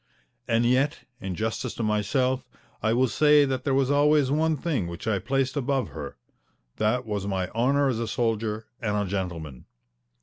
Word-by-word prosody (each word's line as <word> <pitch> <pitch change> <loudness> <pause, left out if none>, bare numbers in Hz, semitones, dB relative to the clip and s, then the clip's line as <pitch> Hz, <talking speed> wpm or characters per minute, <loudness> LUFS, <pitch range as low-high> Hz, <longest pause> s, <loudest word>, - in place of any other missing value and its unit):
And 115 +1 +2
yet, 130 +4 +2 0.2
in 95 -5 -4
justice 110 +4 -3
to 115 - -3
myself, 125 +5 +1 0.4
I 110 - +1
will 125 +3 +3
say 150 +3 +5
that 130 -1 -2
there 140 - +1
was 135 0 +2
always 145 -1 +4
one 155 +1 +2
thing 135 - -1
which 85 +5 -7
I 105 -3 +1
placed 135 +5 -1
above 135 -4 0
her. - - -7 0.6
That 110 +3 +1
was 105 -2 -3
my 95 -2 -1
honour 135 +5 +2
as 125 -4 0
a 115 - -2
soldier 110 -1 -1 0.2
and 105 -3 0
a 105 - 0
gentleman. 85 -8 -4
120 Hz, 175 wpm, -26 LUFS, 105-135 Hz, 0.6 s, say